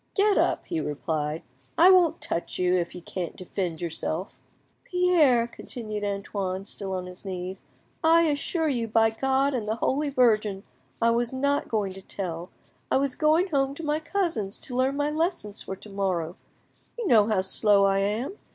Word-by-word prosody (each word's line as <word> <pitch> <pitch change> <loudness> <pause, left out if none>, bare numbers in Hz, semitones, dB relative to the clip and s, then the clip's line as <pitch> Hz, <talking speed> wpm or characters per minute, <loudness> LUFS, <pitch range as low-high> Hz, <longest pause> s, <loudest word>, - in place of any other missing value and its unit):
"Get 410 0 +4
up," - - +1
he 335 - -2
replied; 150 - -3 0.3
"I 360 +3 +8
won't 345 -3 +4
touch 170 - -3
you, 180 0 +2
if 175 -1 -1
you 180 - -9
can't 175 -2 -5
defend 180 -3 -4
yourself. 170 +2 -3 0.4
"Pierre," 335 -10 +3
continued 215 -3 -7
Antoine, 200 -1 -3
still 195 -1 -5
on 180 -1 -4
his 180 0 -11
knees, 185 -1 -5 0.4
"I 330 +1 +6
assure 320 +2 0
you, 240 -6 0
by 225 0 +3
God 270 +4 +1
and 230 -5 -2
the 220 - 0
Holy 285 +5 0
Virgin, 215 -7 +2 0.4
I 230 0 +3
was 235 0 0
not 280 +2 0
going 205 -4 -1
to 195 - -10
tell. 180 -2 -5 0.4
I - - +3
was 275 -1 0
going 325 +4 +2
home 275 -3 0
to 330 - -7
my 300 0 0
cousins 315 - -2
to 250 - -7
learn 260 +2 +1
my 290 +1 0
lessons 315 - -2
for 190 - -6
to 210 - -13
morrow; 185 -4 -1 0.6
you 475 - -3
know 215 -8 +5
how 215 -4 +2
slow 200 +1 +4
I 195 0 +3
am. 220 - -2
225 Hz, 180 wpm, -26 LUFS, 190-290 Hz, 0.6 s, I